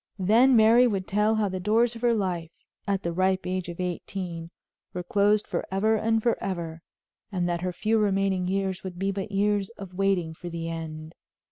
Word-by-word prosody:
Then 225 Hz, +7 st, +5 dB
Mary 230 Hz, +3 st, +6 dB
would 195 Hz, -5 st, -2 dB
tell 210 Hz, +2 st, +2 dB
how 215 Hz, -1 st, +1 dB
the 185 Hz, -1 st, -3 dB
doors 225 Hz, +5 st, +2 dB
of 230 Hz, -, -9 dB
her 240 Hz, -1 st, +3 dB
life, 180 Hz, -5 st, -2 dB, 0.4 s
at 195 Hz, -1 st, 0 dB
the 170 Hz, -, -2 dB
ripe 185 Hz, +1 st, +1 dB
age 185 Hz, -1 st, -2 dB
of 170 Hz, -, -8 dB
eighteen, 180 Hz, -1 st, -4 dB, 0.5 s
were 180 Hz, -, -3 dB
closed 205 Hz, +3 st, +2 dB
forever 215 Hz, +4 st, 0 dB
and 225 Hz, 0 st, +1 dB
forever, 170 Hz, -8 st, -2 dB, 0.5 s
and 180 Hz, -3 st, -1 dB
that 170 Hz, -1 st, -1 dB
her 180 Hz, 0 st, -1 dB
few 220 Hz, +5 st, +1 dB
remaining 195 Hz, -3 st, +1 dB
years 190 Hz, -1 st, -1 dB
would 185 Hz, -2 st, -7 dB
be 195 Hz, +2 st, 0 dB
but 195 Hz, +1 st, -5 dB
years 200 Hz, 0 st, +1 dB
of 195 Hz, -3 st, -9 dB
waiting 185 Hz, -4 st, 0 dB
for 175 Hz, +2 st, -8 dB
the 165 Hz, -1 st, -5 dB
end. 160 Hz, -1 st, -6 dB
195 Hz, 190 wpm, -26 LUFS, 175-210 Hz, 0.5 s, Mary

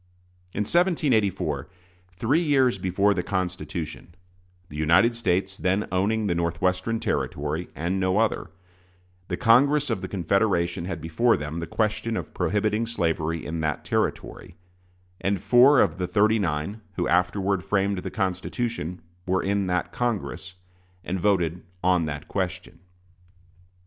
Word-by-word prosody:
In 100 Hz, -, -2 dB
1784, 110 Hz, -, +1 dB, 0.4 s
three 115 Hz, -, +1 dB
years 135 Hz, -, +2 dB
before 95 Hz, +3 st, +2 dB
the 90 Hz, -, -1 dB
Constitution, 85 Hz, -3 st, -4 dB, 0.5 s
the 75 Hz, -, -10 dB
United 85 Hz, +10 st, +4 dB
States 95 Hz, -2 st, -1 dB
then 95 Hz, +3 st, 0 dB
owning 105 Hz, +4 st, +1 dB
the 95 Hz, -, +1 dB
Northwestern 90 Hz, +6 st, 0 dB
Territory 75 Hz, 0 st, -2 dB
and 90 Hz, +4 st, -1 dB
no 95 Hz, +1 st, +1 dB
other, 110 Hz, 0 st, 0 dB, 0.8 s
the -, -, -3 dB
Congress 140 Hz, +5 st, +4 dB
of 95 Hz, -, -1 dB
the 95 Hz, -, -4 dB
Confederation 90 Hz, -2 st, 0 dB
had 85 Hz, -3 st, -5 dB
before 80 Hz, +9 st, +2 dB
them 75 Hz, +3 st, -5 dB
the 85 Hz, -, -4 dB
question 110 Hz, +4 st, -1 dB
of -, -, -6 dB
prohibiting 105 Hz, +2 st, 0 dB
slavery 85 Hz, -6 st, -1 dB
in 80 Hz, +2 st, -4 dB
that 75 Hz, -2 st, -2 dB
Territory; -, -, -2 dB, 0.7 s
and 95 Hz, +1 st, 0 dB
four 125 Hz, +7 st, +6 dB
of -, -, +2 dB
the 90 Hz, -, -1 dB
"thirty 105 Hz, +5 st, +3 dB
nine" 85 Hz, +4 st, -2 dB
who 90 Hz, -, -1 dB
afterward 95 Hz, +1 st, +1 dB
framed 100 Hz, 0 st, 0 dB
the -, -, -5 dB
Constitution 95 Hz, -2 st, -3 dB, 0.2 s
were 95 Hz, 0 st, +1 dB
in 100 Hz, -1 st, 0 dB
that 90 Hz, 0 st, -1 dB
Congress, 105 Hz, -5 st, -3 dB, 0.5 s
and 95 Hz, +2 st, -3 dB
voted 90 Hz, -3 st, +1 dB, 0.2 s
on 90 Hz, -2 st, +3 dB
that 75 Hz, -1 st, -5 dB
question. 95 Hz, -2 st, -4 dB
95 Hz, 135 wpm, -25 LUFS, 85-110 Hz, 0.8 s, four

